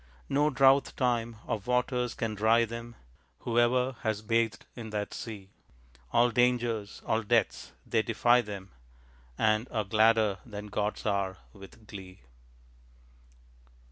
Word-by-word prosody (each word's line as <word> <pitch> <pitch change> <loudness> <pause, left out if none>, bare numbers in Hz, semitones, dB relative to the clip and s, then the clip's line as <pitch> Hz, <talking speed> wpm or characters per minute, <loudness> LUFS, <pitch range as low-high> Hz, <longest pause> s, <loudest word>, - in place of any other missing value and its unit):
No 145 +2 +3
drouth 135 0 +4
time 120 -3 0
of 105 +1 -4
waters 125 -1 0
can 115 -3 -2
dry 110 +3 +3
them. 115 +1 -8 0.5
Whoever 125 +2 +2
has 110 -2 -2
bathed 115 -2 0
in 115 -3 -7
that 105 -1 -3
sea, 100 -4 -8 0.6
All 120 +1 +4
dangers, 120 -3 0
all 110 - +1
deaths, 115 -1 0
they 110 - +1
defy 120 +2 +3
them, 100 -4 -8 0.7
And 110 +2 +2
are 110 -2 -1
gladder 110 -1 +3
than 105 -2 -8
gods 105 0 -2
are, 100 -3 0 0.2
with 100 +2 -14
glee. 95 -3 -11
115 Hz, 125 wpm, -29 LUFS, 105-120 Hz, 0.7 s, drouth